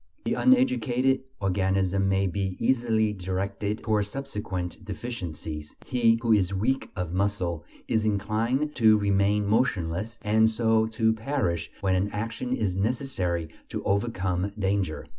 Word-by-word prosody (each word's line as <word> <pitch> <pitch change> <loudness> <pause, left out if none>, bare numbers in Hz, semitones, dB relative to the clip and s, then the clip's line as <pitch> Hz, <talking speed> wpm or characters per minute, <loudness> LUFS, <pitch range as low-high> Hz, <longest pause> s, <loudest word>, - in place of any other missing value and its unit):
The - - +1
uneducated 150 - +3 0.2
organism 95 0 +1
may 95 0 +2
be 95 0 -2
easily 115 -4 +2
directed 100 +2 -3
towards 105 -2 +1
subsequent 105 -8 -4
deficiencies; 85 -9 -6
he 115 -2 +3
who 115 -1 +4
is 100 -2 +2
weak 125 +8 0
of 90 -2 -3
muscle 95 -4 -1 0.2
is 110 -1 +1
inclined 110 +8 0
to 110 -3 +6
remain 100 0 +2
motionless, 105 -2 0
and 110 +1 +4
so 110 0 +2
to 110 0 +2
perish, 110 - -1
when 95 -2 +2
an 95 +2 +1
action 115 +4 -4
is 105 -7 0
necessary 95 - -1 0.2
to - - -4
overcome 95 -2 0
danger. 95 -5 -1
105 Hz, 130 wpm, -27 LUFS, 95-115 Hz, 0.2 s, to